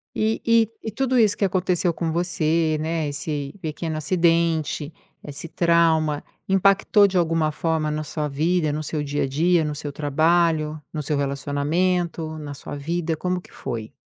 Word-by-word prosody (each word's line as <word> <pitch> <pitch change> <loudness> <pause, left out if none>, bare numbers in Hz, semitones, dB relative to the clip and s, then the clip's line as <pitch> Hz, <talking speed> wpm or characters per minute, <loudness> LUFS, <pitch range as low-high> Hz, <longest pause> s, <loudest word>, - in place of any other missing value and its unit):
E 220 +1 0
e 230 -2 +4
e 220 - -4
tudo 260 +3 0
isso 215 -4 +4
que 200 - +2
aconteceu 180 -2 +1
com 165 0 -2
você, 160 -2 +1
né, 160 -1 -1
esse 145 0 -4
pequeno 160 0 -4
acidente, 165 -2 +1 0.3
esse 150 +3 -7
trauma, 165 -3 +2 0.3
impactou 195 +2 +4
de 190 -1 -1
alguma 165 -2 +2
forma 160 0 -1
na 150 0 -2
sua 150 0 -3
vida, 155 +2 0
no 155 +1 -3
seu 150 0 -3
dia 145 0 -1
a - - 0
dia, 165 +5 +2
no 150 -1 -2
seu 150 0 -5
trabalho, 155 +1 +1
no 155 - -2
seu 150 +1 -1
relacionamento, 155 +4 -1
na 145 -1 -6
sua 140 - -8
vida? 165 +3 -2
Como 180 +3 -2
que - - -18
foi? 115 -3 -6
160 Hz, 165 wpm, -23 LUFS, 150-175 Hz, 0.3 s, e